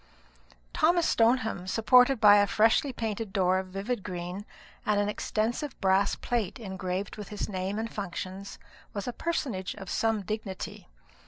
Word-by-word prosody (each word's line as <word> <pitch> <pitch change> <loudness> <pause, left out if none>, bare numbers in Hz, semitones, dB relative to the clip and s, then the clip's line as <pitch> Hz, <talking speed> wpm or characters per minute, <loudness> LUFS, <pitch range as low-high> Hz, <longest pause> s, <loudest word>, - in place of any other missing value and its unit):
Thomas 345 0 +3
Stoneham, 225 -5 +2
supported 250 +5 +5
by 205 -2 +8
a 205 0 +4
freshly 225 +7 +3
painted 225 -3 -4
door 185 -1 +2
of 190 - -5
a - - -16
vivid 200 +4 -3
green 180 +3 -6 0.4
and 210 -1 +2
an 205 - +1
extensive 225 +6 -2
brass 190 0 +3
plate 235 -4 -2
engraved 190 -2 -4
with 210 - -7
his 210 - -4
name 190 0 -3
and 225 +1 -4
functions, 195 0 -6 0.4
was 200 +2 -4
a 245 - -2
personage 245 - -2
of 195 -3 -8
some 225 -2 +1
dignity. 195 - -5
205 Hz, 155 wpm, -28 LUFS, 190-230 Hz, 0.4 s, by